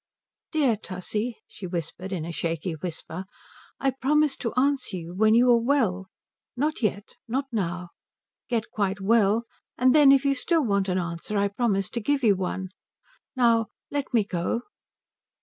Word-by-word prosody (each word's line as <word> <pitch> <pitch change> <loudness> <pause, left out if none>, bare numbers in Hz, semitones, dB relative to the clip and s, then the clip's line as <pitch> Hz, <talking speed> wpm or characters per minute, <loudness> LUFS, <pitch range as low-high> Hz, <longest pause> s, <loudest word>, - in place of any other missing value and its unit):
"Dear 275 -9 +2
Tussie," 210 +4 -4
she 185 - -8
whispered 175 +2 -5
in 170 -5 -3
a 170 - -4
shaky 165 +1 -2
whisper, 165 +2 -6 0.5
"I 270 - +2
promise 290 +2 +2
to 230 - -3
answer 260 -6 +1
you 170 0 -7
when 215 +3 +4
you 245 +2 +5
are 235 -1 +5
well. 225 -8 +1 0.5
Not 300 +3 -1
yet. 205 -2 -2
Not 265 +4 -1
now. 180 -5 -2 0.6
Get 230 -3 -1
quite 200 -2 -1
well, 215 +2 +3 0.3
and 255 +1 +4
then 295 -3 +7
if 275 0 +4
you 280 - +4
still 315 +3 +1
want 200 -3 +1
an 180 - +1
answer 170 +3 -3
I 200 0 +2
promise 200 -3 0
to 235 - -3
give 280 +4 0
you 210 -4 +5
one. 185 0 -3 0.7
Now 230 -3 +3 0.2
let 285 -1 -2
me 230 -4 +3
go." 185 +4 -2
215 Hz, 165 wpm, -26 LUFS, 185-255 Hz, 0.7 s, then